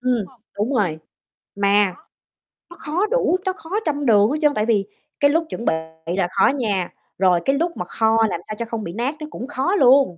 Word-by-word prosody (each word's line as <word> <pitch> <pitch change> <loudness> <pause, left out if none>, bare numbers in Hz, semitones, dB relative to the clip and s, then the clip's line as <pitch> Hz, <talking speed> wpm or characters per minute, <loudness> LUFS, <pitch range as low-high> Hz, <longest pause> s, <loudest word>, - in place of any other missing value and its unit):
Ừm, 245 -3 0 0.3
đúng 215 +7 0
rồi, 175 -9 0 0.6
mà 200 -2 +3 0.7
nó 345 - -12
khó 330 +7 -1
đủ, - - +2
nó 375 - 0
khó 325 - -14 0.2
trăm 290 -2 -1
đường 210 -3 +5
hết 305 - 0
trơn. 295 -1 +4
Tại 215 0 0
vì 210 -4 +2 0.3
cái 285 0 +4
lúc 330 +1 +1
chuẩn 235 - -6
bị - - +3 0.4
là 180 - +2
khó - - +3
nha, 210 -10 0 0.3
rồi 185 -2 +3
cái 275 - +2
lúc 340 +3 -1
mà 180 - -3
kho 220 +4 +1
làm 170 - -4
sao 215 - -5
cho 235 - -2
không 230 -1 -5
bị 170 - -6
nát 245 - -2
nó 305 - -6
cũng 250 - -6
khó 285 +7 0
luôn. 260 - +5
235 Hz, 220 wpm, -21 LUFS, 205-290 Hz, 0.7 s, đường